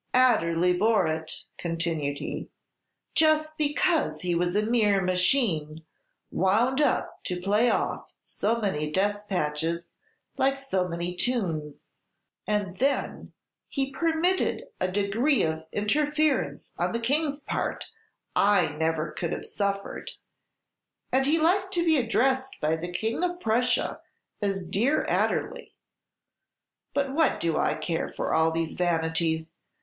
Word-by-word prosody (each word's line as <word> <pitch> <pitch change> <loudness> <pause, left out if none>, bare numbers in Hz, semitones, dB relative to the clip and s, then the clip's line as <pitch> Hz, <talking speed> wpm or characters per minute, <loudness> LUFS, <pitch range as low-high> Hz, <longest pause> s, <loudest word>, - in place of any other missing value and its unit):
"Adderley 180 -9 +4
bore 210 +1 +3
it," 160 0 -3 0.2
continued 165 -4 -1
he, - - -5 0.6
"just 310 0 +3
because 295 - +1
he 180 -1 0
was 175 +2 0
a 210 0 +2
mere 215 -4 +3
machine, 180 - +1 0.5
wound 230 - +2
up 295 - 0
to 180 -1 -3
play 210 +6 +2
off - - -1
so 225 +3 -1
many 155 -8 -1
despatches, 170 -4 -1 0.5
like 270 +1 +2
so 195 -10 -1
many 175 +1 -3
tunes; 170 - -1 0.6
and 205 -3 -1
then, 275 +2 -1 0.4
he 275 -1 -2
permitted 335 +5 +1 0.2
a 185 - +1
degree 210 +8 +2
of 160 0 -2
interference 295 +8 0
on - - 0
the 230 - 0
King's 285 +4 0
part - - -3 0.5
I 205 -3 +4
never 155 +1 -1
could 170 - -3
have - - -4
suffered; 200 -1 -3 1.0
and 265 +1 +2
he 310 +3 +3
liked 380 +4 +2
to 340 -1 +1
be 320 -2 +4
addressed 260 +2 +1
by 155 +1 +1
the 165 +2 -5
King 220 - -2
of 355 0 -1
Prussia 245 -1 +1 0.4
as 195 -3 -1
'Dear 230 - +2
Adderley.' - - -1 1.2
But 275 -1 0
what 320 +2 +2
do 165 -2 0
I - - +1
care 160 +1 -2
for - - -2
all 160 0 +4
these 165 0 -2
vanities? 165 -2 0
205 Hz, 130 wpm, -27 LUFS, 165-270 Hz, 1.2 s, Adderley